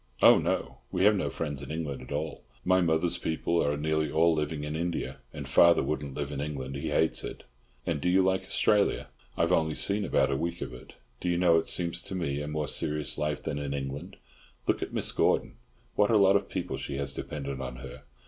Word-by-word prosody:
"Oh, - - +8
no. - - -2
We 90 - +1
have 105 +1 +6
no 95 - 0
friends 75 -4 -4
in 70 - -8
England 75 -3 -3
at - - -11
all. 75 +2 -3 0.2
My 95 0 +4
mother's 85 +1 +1
people 85 +1 0
are 75 0 0
nearly 80 +1 0
all 80 +2 +4
living 75 -1 -2
in 75 +1 -3
India, 85 +1 -2
and - - -7
father 85 -3 +6
wouldn't 70 -1 -3
live 70 -1 -3
in 70 -1 -3
England. 70 -3 -4
He 70 - -3
hates 80 - +1
it." - - -7 0.4
"And 75 -4 -1
do 90 - +1
you 95 +1 +5
like 95 0 +2
Australia?" 105 -1 +2 0.3
"I've 85 +1 +2
only 80 -3 +2
seen 100 +1 +1
about 70 -7 +2
a - - +1
week 85 +4 -2
of - - -4
it. 65 - -12 0.3
Do 90 - -2
you 85 - +2
know, 85 -2 +5
it - - -5
seems 85 -2 0
to 95 - -6
me 75 -5 -1
a 75 - -4
more 75 -1 -2
serious 75 +2 -2
life 75 -1 -1
than 75 -2 -2
in 70 -1 -3
England. 70 +7 -5 0.5
Look - - +1
at - - -3
Mrs. - - -3
Gordon, - - +2 0.4
what 105 - +4
a 115 - +5
lot 100 -1 +6
of 100 - +1
people 85 -7 -3
she 70 +1 -4
has 70 -1 -3
dependent 70 -3 -5
on 65 -1 -5
her. 65 0 -9
80 Hz, 225 wpm, -29 LUFS, 70-85 Hz, 0.5 s, Oh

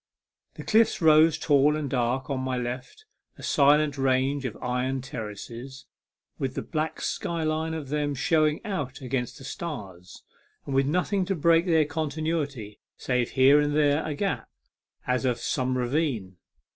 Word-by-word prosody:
The - - -8
cliffs 220 +1 +3
rose 160 -1 +5
tall 145 0 +3
and 155 -2 -2
dark 125 0 -1
on 135 -2 -2
my 130 -1 -2
left, 125 - -6 0.3
a - - -12
silent 145 0 +3
range 135 +1 +1
of 115 - -4
iron 125 +1 -1
terraces, 120 +2 -8 0.5
with 135 -1 -2
the - - -3
black 155 -1 -3
sky 170 -1 -2
line 160 +1 -1
of 150 -4 -6
them 145 -1 -1
showing 155 - +1
out 145 - -4
against 125 -2 -3
the 135 - -12
stars, 100 - -7 0.4
and 140 - -4
with 135 0 +2
nothing 180 +5 +1
to 195 - -1
break 165 +2 +3
their 160 -3 +4
continuity 150 -7 -3 0.2
save 125 -2 0
here 135 +2 +6
and 145 0 0
there 150 0 +3
a 155 -2 -3
gap, 195 +5 -2 0.6
as 125 0 0
of 125 -2 +1
some 130 +1 -1
ravine. 120 - -1
140 Hz, 160 wpm, -26 LUFS, 130-155 Hz, 0.6 s, here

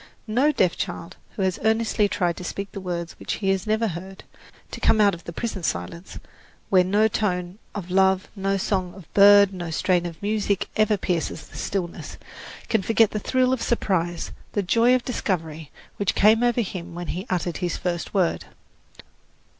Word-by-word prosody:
No 250 +7 +2
deaf 185 - +2
child 170 - -5 0.2
who 195 - -1
has 185 -1 0
earnestly 220 -1 +2
tried 175 -3 0
to - - -7
speak 200 +3 -5
the 195 - -7
words 170 -2 -4
which - - -3
he 195 - -2
has 195 +1 0
never 220 +1 +1
heard 190 +3 -8 0.5
to - - -6
come 220 - +3
out 205 -2 +5
of 170 - -9
the - - -6
prison 220 +3 -4
of 170 - -5
silence, 150 - -4 0.5
where 185 -2 +6
no 205 +4 +3
tone 180 -3 -2 0.2
of 185 -3 -6
love, 190 0 +3
no 195 0 0
song 185 -2 -1
of 190 -5 -15
bird, 200 0 +7
no 175 -2 -5
strain 175 +2 +1
of 165 -2 -9
music 205 -1 -1
ever 215 -1 +3
pierces 175 -3 -2
the - - -16
stillness 180 -3 -4 0.5
can 220 - +1
forget 225 +2 +3
the 210 - -2
thrill 255 +4 +1
of 255 - -2
surprise, 175 -7 -1 0.2
the 205 - 0
joy 230 +6 +4
of 255 - -2
discovery 165 - -3 0.3
which 200 - 0
came 220 +2 +5
over 240 0 +2
him 180 -4 -6
when 175 0 -6
he 185 +6 -4
uttered 175 -2 -1
his 180 -2 -2
first 175 -1 -3
word. 185 -4 0
195 Hz, 185 wpm, -24 LUFS, 175-215 Hz, 0.5 s, bird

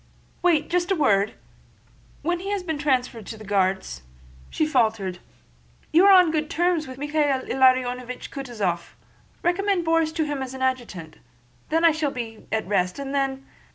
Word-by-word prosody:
"Wait—just 345 +1 +2
a 385 - +2
word! 210 - +2 0.9
When 345 +3 0
he 385 +2 -5
has 405 -2 -1
been 320 -4 -3
transferred 255 -6 0
to 220 - -7
the 215 - -11
Guards..." 190 - 0 0.5
she 310 - 0
faltered. 220 -10 0 0.7
"You 345 +4 +6
are - - +8
on 365 -4 +7
good 310 -1 -1
terms 340 -1 +1
with 260 0 -9
Michael 295 +2 -1 0.3
Ilariónovich 255 -1 +1
Kutúzov... 215 -11 -3 0.5
recommend 365 0 +1
Borís 325 -1 +2
to 320 -2 +1
him 290 -2 -3
as 260 0 -5
adjutant! 245 -11 -3 0.5
Then 325 +2 +2
I 335 - +7
shall 310 -2 -1
be 235 -5 -7
at 220 0 0
rest, 180 -2 0
and 275 0 -5
then..." 270 -1 -1
270 Hz, 155 wpm, -24 LUFS, 225-325 Hz, 0.9 s, are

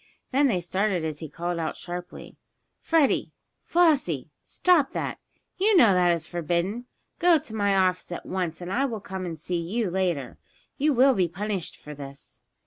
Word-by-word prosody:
Then 280 +2 +4
they 190 -8 0
started 185 0 0
as 155 -2 -4
he 160 - -7
called 170 +3 -3
out 160 - -3
sharply: 180 0 -8 0.4
"Freddie! 320 -4 +2 0.3
Flossie! 275 - +2
Stop 345 -6 +2
that! - - -3 0.4
You 410 +1 +4
know 225 - +7
that 180 -1 +3
it 170 - +4
is 165 -2 -5
forbidden! 175 +8 -2 0.3
Go 345 -1 +6
to 285 -7 -9
my 200 -2 +1
office 185 -1 +1
at 175 - -6
once 180 -3 -3
and 180 +2 -4
I 270 +5 +2
will 230 -5 -3
come 190 -1 -6
and 165 -2 -5
see 175 +3 -3
you 195 +3 -2
later. 175 -9 -1 0.4
You 295 +2 +2
will 265 +1 +5
be 185 -6 +2
punished 195 +1 -4
for 150 - -10
this!" 140 -1 -11
185 Hz, 180 wpm, -26 LUFS, 170-245 Hz, 0.4 s, know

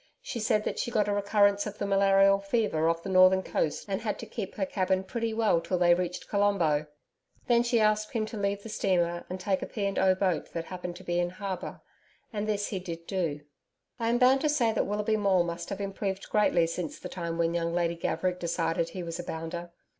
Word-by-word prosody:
She 260 - -4
said 215 -1 +1
that - - -3
she - - -1
got 215 -3 +1
a 205 - +1
recurrence 200 0 +2
of 210 0 -7
the - - -2
malarial 195 0 +4
fever 195 -6 +1
off 165 0 -1
the - - -6
northern 185 0 +6
coast 155 - -1
and 195 +1 -2
had 215 -2 -2
to - - -7
keep 215 -3 -6
her 195 - 0
cabin 190 0 0
pretty 230 +4 -3
well 220 -6 +2
till 175 +2 -1
they 175 -1 +5
reached 180 0 -3
Colombo. 180 -8 +2 0.6
Then 235 -1 +4
she 240 -1 +2
asked 215 0 +2
him 220 -2 0
to 215 - -8
leave 200 -1 -1
the - - -7
steamer 175 -4 0
and 185 +1 -4
take 190 0 0
a - - -4
P. 205 -3 -3
and 195 - -1
O. 190 -1 +4
boat 185 -3 -1
that 165 -1 -3
happened 180 -1 -6
to 185 - -11
be 175 -1 -1
in 175 0 +1
harbour 185 0 -6 0.5
and 210 0 -2
this 205 -1 -1
he 195 - -3
did 170 -2 -7
do. 165 -7 -2 0.6
I 230 -1 0
am 240 - +3
bound 260 +2 +5
to 305 - +2
say 245 -7 +2
that - - 0
Willoughby 210 +2 0
Maule 195 -4 +3
must 170 0 -5
have 195 - -4
improved 195 -1 -4
greatly 195 -5 +3
since 165 0 -4
the - - -7
time 170 -2 -4
when 170 0 +1
young 170 -1 -1
Lady 170 0 +1
Gaverick 180 +2 -1
decided 165 -1 -1
he 185 - -6
was 170 0 -5
a - - -3
'bounder.' 170 +1 -5
190 Hz, 230 wpm, -28 LUFS, 175-210 Hz, 0.6 s, northern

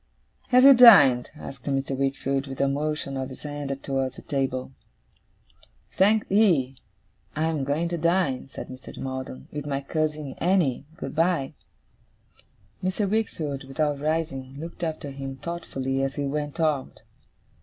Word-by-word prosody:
'Have 250 0 +5
you 275 0 +10
dined?' 170 - +8
asked 135 -4 -10
Mr. 135 -1 -1
Wickfield, 135 0 -1
with 135 -1 -7
a 140 - +3
motion 145 0 -2
of 130 0 -3
his 130 - -11
hand 145 -2 -4
towards 135 -2 -2
the - - -12
table. 135 -2 -2 1.2
'Thank'ee. 195 -9 +3 0.6
I 155 - 0
am 160 -3 0
going 145 +5 0
to 170 -1 -2
dine,' 170 -6 +1
said 135 - -8
Mr. 130 0 -10
Maldon, 130 - -6
'with 150 -1 -5
my 140 -1 -1
cousin 150 -1 -2
Annie. 170 -7 +1
Good - - -6
bye!' 165 -4 +1 1.3
Mr. 190 +2 0
Wickfield, 160 -10 -2
without 145 +1 -1
rising, 145 -4 -2
looked 170 +2 -7
after 155 -3 -3
him 135 0 -6
thoughtfully 135 -4 -3
as 135 0 -2
he 145 - -2
went 145 +3 -3
out. 155 -4 -1
145 Hz, 145 wpm, -25 LUFS, 135-165 Hz, 1.3 s, you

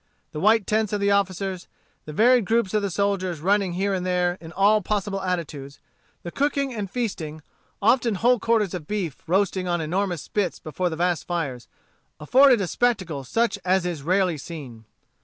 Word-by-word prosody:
The 150 - -5
white 215 +3 +4
tents 215 -1 0
of 205 - 0
the 200 0 +2
officers, 190 -2 -1 0.4
the 155 - -7
varied 240 +8 +4
groups 225 -2 +1
of 215 - +2
the 200 - -1
soldiers, 185 -3 -1
running 195 +2 +1
here 195 +2 0
and 185 -1 -2
there, 180 -1 +1
in 160 -1 -10
all 210 +2 +4
possible 200 0 -2
attitudes, 155 -7 -4 0.4
the 170 - -6
cooking 280 0 0
and 205 -4 -4
feasting, 175 -10 -4 0.4
often 230 0 +3
whole 240 +5 +3
quarters 220 -5 +1
of 165 -5 -6
beef 190 -10 -3
roasting 185 +1 +1
on 175 -1 0
enormous 175 +1 -2
spits 200 -5 -2
before 180 +3 -3
the 160 - -4
vast 175 0 -1
fires, 140 -9 -3 0.5
afforded 250 - +5
a - - 0
spectacle 185 - -1
such 220 - 0
as 185 0 +2
is 170 -5 -3
rarely 180 0 +1
seen. 135 -9 -9
190 Hz, 175 wpm, -24 LUFS, 170-210 Hz, 0.5 s, afforded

